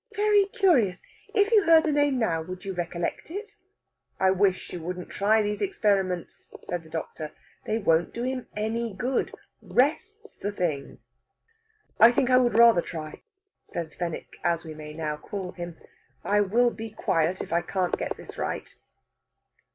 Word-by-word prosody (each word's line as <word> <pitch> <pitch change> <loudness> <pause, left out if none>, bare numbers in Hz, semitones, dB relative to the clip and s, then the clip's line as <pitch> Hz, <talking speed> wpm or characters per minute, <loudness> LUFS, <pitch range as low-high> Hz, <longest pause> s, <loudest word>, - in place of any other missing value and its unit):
"Very 415 -1 +4
curious! 325 - +2 0.3
If 410 0 +2
you 425 -3 +5
heard 325 -1 +7
the 315 - +1
name 290 -2 +2
now, 170 -9 +1
would 185 +3 -8
you 195 - -3
recollect 175 - -3
it?" 410 +4 -7 0.6
"I 190 0 +4
wish 190 0 +1
you 175 - -5
wouldn't 180 +2 -6
try 215 +2 +3
these 210 0 -2
experiments," 200 - -1
says 175 -1 -3
the 160 - -17
doctor. 160 -1 -5 0.3
"They 220 - +1
won't 170 -6 +2
do 235 - -4
him 255 0 -3
any 220 0 -2
good. 250 +6 -1 0.3
Rest's 420 - 0
the 205 - -3
thing." 160 -8 -3 1.0
"I 230 +2 +9
think 250 +1 +1
I 255 - +7
would 240 -3 +3
rather 230 -6 +7
try," 155 -3 -7 0.4
says 160 -3 -6
Fenwick, 170 -2 -5
as 170 -1 +1
we 160 - -7
may 150 0 -9
now 155 -2 -3
call 185 +3 -6
him. 175 -2 -7 0.5
"I 205 0 +3
will 235 +5 +3
be 225 -1 -7
quiet 180 -4 0
if - - -5
I 170 - +3
can 180 +1 -1
get - - -2
this - - -11
right." - - -4
200 Hz, 165 wpm, -26 LUFS, 175-250 Hz, 1.0 s, I